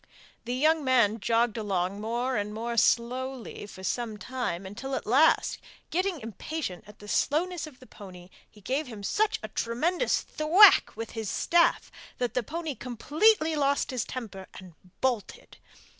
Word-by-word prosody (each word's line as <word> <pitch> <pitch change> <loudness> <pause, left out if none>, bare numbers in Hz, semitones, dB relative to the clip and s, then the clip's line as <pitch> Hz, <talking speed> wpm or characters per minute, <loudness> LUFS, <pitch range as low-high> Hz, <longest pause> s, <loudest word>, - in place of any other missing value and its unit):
The 245 +1 -2
young 310 +3 +3
man 235 -5 +3
jogged 230 +1 +1
along 195 -2 -2
more 240 +4 -1
and 210 0 -2
more 235 +1 -3
slowly 245 0 0
for 190 -2 -12
some 225 +1 -2
time, 210 -7 -4
until 260 +8 -5
at - - -4
last, 275 +9 +3 0.3
getting 365 0 0
impatient 225 - -5
at 210 - -14
the 210 - -13
slowness 330 +8 0
of 275 -5 -14
the 255 - -14
pony, 185 -6 -12 0.2
he 210 - -19
gave 265 +9 -2
him 215 -4 -9
such 425 - +1
a - - -4
tremendous 325 - 0
thwack 340 +7 +5
with 225 - -5
his 220 -3 -4
staff 340 0 +2 0.3
that 245 -1 -2
the 250 - +1
pony 320 +5 -4
completely 310 - +2
lost 280 -1 +1
his 255 -2 -1
temper 210 -7 -7
and 185 -2 -11 0.3
bolted. 245 -6 -2
245 Hz, 160 wpm, -28 LUFS, 210-300 Hz, 0.3 s, thwack